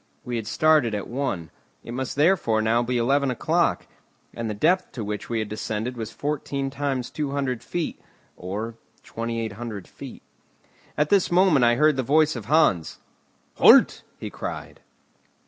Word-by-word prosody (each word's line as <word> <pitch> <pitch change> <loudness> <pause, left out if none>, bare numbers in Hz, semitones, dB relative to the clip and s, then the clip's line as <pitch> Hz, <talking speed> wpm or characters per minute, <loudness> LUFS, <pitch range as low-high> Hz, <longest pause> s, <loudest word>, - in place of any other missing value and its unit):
We 120 -1 -3
had 110 -2 -5
started 150 -3 +3
at 100 - -4
one, 115 - -3 0.3
it 120 - -8
must 130 0 -4
therefore 145 -8 +3
now 110 +2 +2
be 120 +1 -1
eleven 135 +4 +2
o'clock; 125 - 0 0.5
and 115 -1 -4
the 105 - -3
depth 175 - +1
to 115 - -5
which 105 0 -5
we 115 - -1
had 110 -1 -2
descended 110 +3 -4
was 115 -2 -5
fourteen 140 0 -3
times 135 -3 -3
200 140 -4 -2
feet, 175 -2 -4 0.3
or 105 +6 -5 0.3
2,800 115 -2 -5
feet. - - -11 0.7
At 150 0 +1
this 195 -3 +3
moment 175 -7 +4
I 120 0 +4
heard 150 +2 +3
the - - +2
voice 155 +4 +3
of 115 -4 -6
Hans. 125 - +2 0.6
"Halt!" - - +6 0.2
he - - -7
cried. - - -7
125 Hz, 155 wpm, -24 LUFS, 110-145 Hz, 0.7 s, Halt